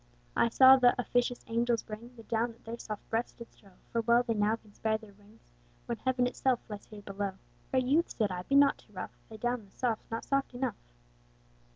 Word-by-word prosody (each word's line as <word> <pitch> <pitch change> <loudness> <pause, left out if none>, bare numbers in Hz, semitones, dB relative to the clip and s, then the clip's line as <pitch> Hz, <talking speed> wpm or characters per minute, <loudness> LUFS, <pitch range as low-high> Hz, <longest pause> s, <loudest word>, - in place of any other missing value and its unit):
I 235 - +4
saw 260 +3 +8
th'officious 245 0 +2
angels 235 0 +1
bring, 230 +3 -9
The 225 - -12
down 230 +1 -1
that 225 - -25
their 230 +1 -6
soft 215 -2 -7
breasts 225 +2 0
did 235 - -11
strow, 195 -2 -21 0.2
For 230 - +1
well 235 +1 +4
they 235 -2 0
now 210 +1 +2
can 215 -2 -20
spare 220 +1 0
their 220 -2 -15
wings, 205 +2 -21 0.4
When 235 -2 -3
Heaven 260 -1 +1
itself 250 0 +1
lies 210 -2 -7
here 210 -1 -11
below. 200 0 -3 0.4
Fair 260 - +3
youth 290 +7 +2
(said 215 -4 0
I) 180 -1 -3
be 275 +10 -1
not 280 0 +6
too - - -22
rough, - - -6
Thy 220 - -9
down 240 +1 -1
though 200 - -19
soft's 230 +2 -2
not 225 0 -4
soft 275 -2 0
enough. 245 -3 -2
230 Hz, 215 wpm, -31 LUFS, 215-245 Hz, 0.4 s, saw